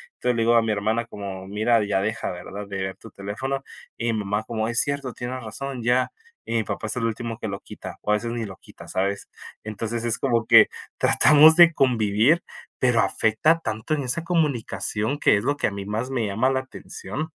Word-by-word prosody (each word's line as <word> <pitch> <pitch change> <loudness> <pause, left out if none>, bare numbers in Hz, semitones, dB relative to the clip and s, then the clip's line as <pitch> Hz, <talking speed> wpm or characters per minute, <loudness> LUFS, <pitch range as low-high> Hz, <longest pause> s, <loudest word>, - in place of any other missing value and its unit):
Entonces 125 -1 0
le 115 - 0
digo 115 +1 +3
a 115 - +6
mi 110 - -1
hermana 110 +3 0
como: 95 -4 -7
"Mira, 110 +2 +1
ya 95 -1 0
deja, 110 0 -2
¿verdad?, 100 +3 -8
de 100 - -5
ver 95 0 -4
tu - - -13
teléfono". 115 +8 -4 0.3
Y 120 0 -1
mi 110 - -1
mamá 105 +1 -2
como: 110 0 -3
"Es 115 +1 +5
cierto, 140 -3 -2
tiene 125 +1 -5
razón, 125 +3 -6
ya". 125 +2 +2 0.3
Y - - -5
mi 115 - +2
papá 110 - -4
es 110 - -1
el 115 - -1
último 115 0 -3
que - - -4
lo 100 0 -5
quita - - -10
o 105 - -1
a - - +5
veces 115 +2 -3
ni 115 -2 -3
lo 95 - -9
quita, - - -15
¿sabes? 100 +1 -2 0.3
Entonces 115 +2 -4
es 115 -2 +1
como 115 -3 0
que - - +8 0.3
tratamos 150 +5 +7
de 170 -1 +8
convivir, 120 +3 +2 0.4
pero 120 -2 +3
afecta 155 +10 +2
tanto 110 +1 -3
en 145 -2 -1
esa 130 +6 -1
comunicación 145 -6 -1
que - - +4
es 100 - -3
lo 145 +3 +1
que - - +1
a - - -3
mí 100 0 -6
más 110 +5 -3
me 125 -4 -1
llama 110 +6 +1
la 130 0 0
atención. 130 +3 -7
115 Hz, 220 wpm, -24 LUFS, 105-130 Hz, 0.4 s, que